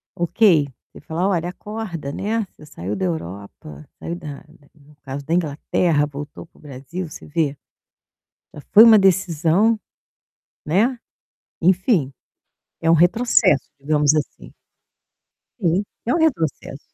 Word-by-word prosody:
ok, 175 -3 +3 0.3
você - - -13
fala: 170 +4 -2
"Olha 175 -2 -1
acorda, 185 -7 -6
né, 220 +6 -2
você 150 - -16
saiu 100 - -6
da 190 - -2
Europa, 95 - -7
saiu 170 - -5
da 150 -5 -8
da 150 -2 -22
no 145 +1 -21
caso 140 +1 -6
da 160 - -2
Inglaterra, 155 -1 +1
voltou 145 +1 -9
para - - -28
o - - -21
Brasil, 150 +5 -7
você - - -11
vê?" 150 -2 -1 1.0
Já - - -9
foi 220 +2 +10
uma 225 -2 +8
decisão, 190 +2 +2 0.9
né, 220 - +1 0.6
enfim, 180 - +2 0.7
é 165 - +1
um 165 - +6
retrocesso 175 - +3
digamos 150 +1 +2
assim. 150 -1 -4 1.1
Sim, 180 0 +1 0.2
é 245 - +1
um - - +1
retrocesso. 165 - -1
165 Hz, 135 wpm, -21 LUFS, 145-190 Hz, 1.1 s, foi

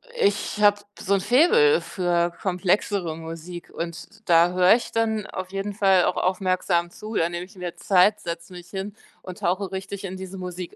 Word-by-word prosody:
ich 205 - 0
habe 205 0 +5 0.2
so 200 - 0
'n 190 - 0
Faible 440 - +4
für 175 -2 0
komplexere 185 -2 0
Musik 165 +2 -8
und 170 0 -6 0.2
da 170 +1 +6
höre 180 +3 +5
ich 235 - -4
dann 220 -2 0
auf 185 0 -6
jeden 195 +1 -3
Fall 195 -3 +4
auch - - 0
aufmerksam 185 -2 0
zu. 215 +3 -8
Da 165 - +2
nehme 175 +1 -5
ich 195 - -19
mir 180 -2 -6
Zeit, 200 +2 +3
setze 170 +2 -7
mich 175 0 -11
hin 195 +2 -5 0.3
und 185 -1 -9
tauche 185 +3 -1
richtig 195 +1 -6
in 190 0 -5
diese 190 0 -8
Musik 180 -1 -7
185 Hz, 185 wpm, -24 LUFS, 175-200 Hz, 0.3 s, da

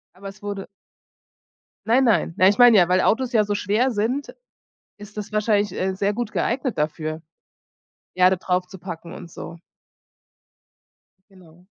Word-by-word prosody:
Aber 195 +1 -9
es 200 +2 -13
wurde 200 -1 -5 1.2
Nein, 255 +4 +4
nein. 225 -7 +2
Nein, 185 +2 +5
ich 205 - -2
meine 245 -3 +8
ja, 175 -1 +4
weil 185 +1 +3
Autos 255 +2 +1
ja 220 -2 +4
so 205 0 -2
schwer 220 +8 +1
sind, 235 +6 -2 0.6
ist 205 +1 -13
das 210 0 -6
wahrscheinlich, 210 -2 +1
äh, 190 0 -2
sehr 200 +2 0
gut 235 -1 -4
geeignet 255 - -2
dafür, 155 +1 -3 0.9
Erde 185 +1 +4
draufzupacken 180 -2 -4
und 170 - -11
so. 170 0 -10 1.7
Genau. 180 -1 -20
200 Hz, 140 wpm, -22 LUFS, 180-215 Hz, 1.7 s, meine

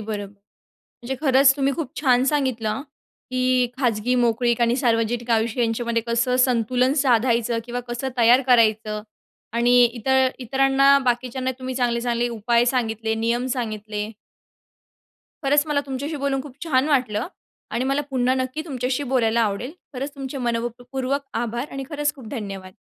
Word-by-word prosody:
बरोब 205 -2 -5 0.5
म्हणजे 255 +2 -7
खरंचं 270 -1 +5
तुम्ही 275 0 +1
खूप 310 -6 -4
छान 255 -3 +3
सांगितलं, 260 -4 0 0.5
की 255 0 +2
खाजगी 245 -2 +1
मोकळीक 240 0 +1
आणि 235 +1 +3
सार्वजनिक 235 -1 0
आयुष्य 225 +2 +1
यांच्यामध्ये 230 0 0
कसं 240 +2 +1
संतुलन 250 +1 +1
साधायचं? 235 -2 +2
किंवा 245 +1 -4
कसं 240 +2 -3
तयार 240 +2 +6
करायचं? 220 -3 +3 0.5
आणि 245 +1 +4
इतर 260 +3 +2
इतरांना 270 +2 +4
बाकीच्यांना 255 +1 -1
तुम्ही 260 0 -5
चांगले, 240 -2 0
चांगले 240 0 0
उपाय 235 +1 +1
सांगितले, 225 -3 0
नियम 235 +3 0
सांगितले. 215 -2 -4 1.3
खरंचं 290 +2 +3
मला 285 -1 +1
तुमच्याशी 280 +4 -4
बोलून 275 -1 -1
खूप 280 -3 -11
छान 280 -3 +2
वाटलं. 250 -6 +1 0.4
आणि 250 - -1
मला 275 +2 +1
पुन्हा 255 0 +1
नक्की 260 +4 -2
तुमच्याशी 260 -2 -2
बोलायला 235 -2 +2
आवडेल. 225 +6 -1 0.2
खरंच 275 +3 -5
तुमचे 275 0 -6
मनःपूर्वक 245 +3 -2 0.2
आभार. 240 +3 -3
आणि 270 0 -5
खरंच 295 -1 -1
खूप 265 -6 -12
धन्यवाद. 195 -6 -6
245 Hz, 140 wpm, -23 LUFS, 230-265 Hz, 1.3 s, तयार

